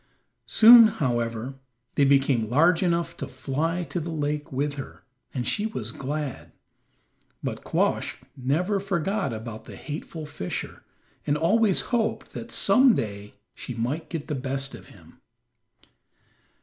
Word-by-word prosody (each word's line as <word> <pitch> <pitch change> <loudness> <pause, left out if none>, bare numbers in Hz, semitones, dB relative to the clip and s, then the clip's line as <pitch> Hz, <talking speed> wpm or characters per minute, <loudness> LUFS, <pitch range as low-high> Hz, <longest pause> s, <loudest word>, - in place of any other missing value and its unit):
Soon, 230 0 +9
however, 120 - -2 0.3
they 140 - +3
became 135 -5 +3
large 165 +7 +4
enough 170 -2 0
to - - -5
fly 150 +7 -2
to 175 - -4
the 165 +1 -5
lake 150 0 -2
with 145 +2 -1
her, 140 -2 -9 0.3
and 125 -3 -3
she 210 +1 0
was 120 - -5
glad. 140 +1 -5 0.9
But - - -4
Quoskh - - 0 0.2
never 160 +10 0
forgot 195 - -1
about 110 0 -7
the - - -10
hateful 155 +1 -7
fisher, 115 -12 -5 0.5
and 145 0 +2
always 195 +5 +3
hoped 230 -2 0
that - - -8
some 255 -2 +5
day 100 -1 -5 0.2
she 125 - -7
might 125 +8 -3
get 165 -4 -5
the 155 - -2
best 135 0 -2
of - - -11
him. - - -18
145 Hz, 135 wpm, -26 LUFS, 130-170 Hz, 0.9 s, Soon